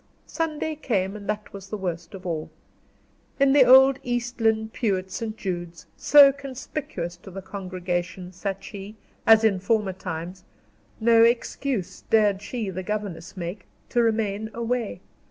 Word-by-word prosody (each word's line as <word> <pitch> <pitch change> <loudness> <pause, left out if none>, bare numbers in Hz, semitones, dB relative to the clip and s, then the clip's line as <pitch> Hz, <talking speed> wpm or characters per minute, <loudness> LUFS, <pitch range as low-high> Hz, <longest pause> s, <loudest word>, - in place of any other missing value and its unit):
Sunday 315 -1 -2
came, 200 -9 -1
and 205 -1 -9
that 210 0 -3
was 195 -1 -9
the 215 - -3
worst 175 -1 -5
of 185 -1 -11
all. 160 -3 -3 0.9
In 275 0 +5
the 285 -2 +7
old 265 +1 +7
East 245 0 -3
Lynne 220 -1 +2
pew 215 -4 0
at 185 0 -8
St. 220 +1 -4
Jude's, 175 -4 -5
so 285 -2 +7
conspicuous 265 - -6
to 185 - -13
the 190 +1 -8
congregation, 185 -1 -4
sat 195 +1 -4
she, 200 +1 -8 0.3
as 225 0 +7
in 205 -4 +3
former 205 -1 +1
times; 180 0 -6 0.6
no 230 0 +5
excuse, 235 -2 0
dared 210 -3 +3
she, 210 -1 -4
the 185 +1 -4
governess 190 -3 -5
make, 180 +2 -6 0.2
to 240 - +2
remain 220 -2 0
away. 235 -5 -2
205 Hz, 155 wpm, -25 LUFS, 185-235 Hz, 0.9 s, the